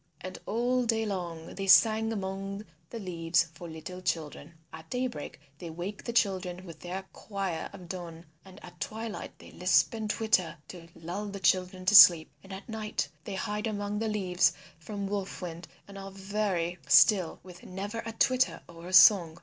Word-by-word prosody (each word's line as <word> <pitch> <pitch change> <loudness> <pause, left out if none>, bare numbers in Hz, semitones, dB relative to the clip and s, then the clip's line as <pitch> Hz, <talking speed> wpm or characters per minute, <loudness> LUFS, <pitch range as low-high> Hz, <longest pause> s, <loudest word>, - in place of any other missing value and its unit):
And 185 - -7
all 245 +3 +1
day 225 -1 0
long 175 -5 -5
they 195 0 -5
sing 220 +2 +5
among 195 0 -5 0.2
the 235 - -7
leaves 170 -4 0
for 170 +1 -10
little 170 +3 -8
children. 160 -2 -4 0.2
At 160 0 -11
day 250 +1 -1
break 150 - -6 0.2
they 170 - -7
wake 175 +5 -6
the 235 - -4
children 185 -5 0
with 165 -3 -11
their 185 +2 -5
choir 195 -6 -4
of 185 -3 -12
dawn, 170 -2 -8 0.2
and 190 -1 -14
at 175 -1 -15
twilight 220 +5 -6
they - - -14
lisp 180 +6 +2
and 220 -2 -4
twitter 210 -7 +1
to 170 -2 -10
lull 175 +6 -5
the 200 -1 -6
children 185 0 +1
to 200 - +3
sleep. 175 -4 +9
And 195 - -13
at 190 +1 -8
night 220 -2 -3 0.2
they 200 - -5
hide 210 +3 -3
among 205 -1 -3
the 225 - -1
leaves 190 -4 +1 0.3
from 200 +4 -6
Wolf 200 -1 -4
Wind 170 -2 -7 0.2
and 200 0 -10
are 195 0 -7
very 195 -3 -2
still 180 0 +5
with 180 -1 -13
never 200 +5 -6
a 225 0 -6
twitter 255 +3 +1
or 170 0 -12
a 185 - -8
song. 175 -5 +7
190 Hz, 180 wpm, -29 LUFS, 175-210 Hz, 0.3 s, sleep